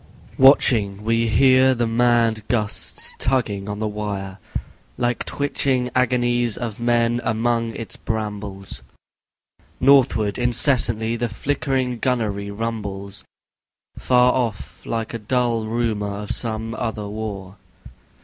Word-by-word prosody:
Watching, 110 -7 +4
we 115 +1 +1
hear 130 +3 +5
the 120 0 0
mad 115 -1 +2
gusts 105 -3 +1
tugging 105 -6 0
on 105 - -4
the 110 +1 -2
wire. 100 -2 -5 0.6
Like 120 -1 -1
twitching 135 -3 0
agonies 120 -2 +1
of 115 -3 -5
men 120 0 +1
among 115 +1 0
its 115 - -4
brambles. 100 - -5 1.0
Northward 125 -6 +3
incessantly, 120 -2 +2
the 120 0 -2
flickering 130 -1 -2
gunnery 110 -6 -1
rumbles, 100 -3 -5 0.7
Far 125 0 +3
off, 115 -6 -4
like 115 -1 -3
a 115 - -4
dull 115 0 0
rumour 105 -3 -2
of 105 - -5
some 115 -1 -3
other 110 -3 -4
war. 100 -2 -6
115 Hz, 110 wpm, -22 LUFS, 105-120 Hz, 1.0 s, hear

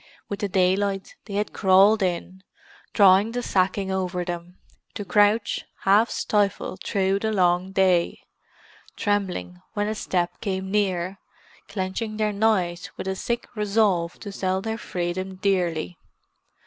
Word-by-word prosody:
With 200 - -4
the 205 - -2
daylight 195 +1 +1
they 200 - -6
had 210 +1 -1
crawled 195 +2 +5
in, 185 +1 -2 0.5
drawing 200 +2 +5
the 245 0 -2
sacking 190 0 0
over 180 -1 -2
them, 175 0 -6 0.4
to 205 - -4
crouch, 210 +2 +2 0.2
half 205 +4 +4
stifled 200 -3 -1
through 195 -1 +1
the 220 +1 -1
long 180 -1 +2
day, 185 -3 +2 0.7
trembling 180 - -2
when 205 0 -1
a 215 - -1
step 175 -4 -2
came 190 -2 -3
near, 190 -2 0 0.5
clenching 200 +2 -3
their 215 -1 0
knives 190 -5 +1
with - - -5
a 190 - -1
sick 235 +5 -2
resolve 200 -5 +1
to 205 - -6
sell 190 -1 -1
their 220 +3 -4
freedom 185 +1 -3
dearly. 175 - -1
190 Hz, 135 wpm, -24 LUFS, 185-205 Hz, 0.7 s, crawled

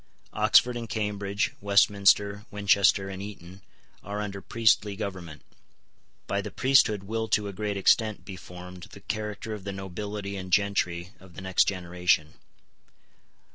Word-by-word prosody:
Oxford 125 0 +4
and 115 -2 -5
Cambridge, 105 -2 -2
Westminster, 100 0 +3
Winchester, 100 -1 +3
and 95 0 -6
Eton, 95 -2 -10 0.4
are 100 +2 -5
under 100 -2 -5
priestly 105 -2 +2
government. 90 -7 -6 0.8
By - - -1
the - - -6
priesthood 130 -7 +3
will 110 +2 -3
to 105 -1 +1
a 100 - -6
great 105 +1 -3
extent 110 +2 +2
be 95 - -7
formed 90 -1 -11
the 100 - -12
character 105 +2 -4
of 105 -3 -7
the 100 - -4
nobility 100 +1 -5
and 95 -1 -7
gentry 90 -3 +1
of 95 -2 -17
the - - -8
next 95 -1 +2
generation. 90 -4 0
100 Hz, 140 wpm, -27 LUFS, 95-105 Hz, 0.8 s, Oxford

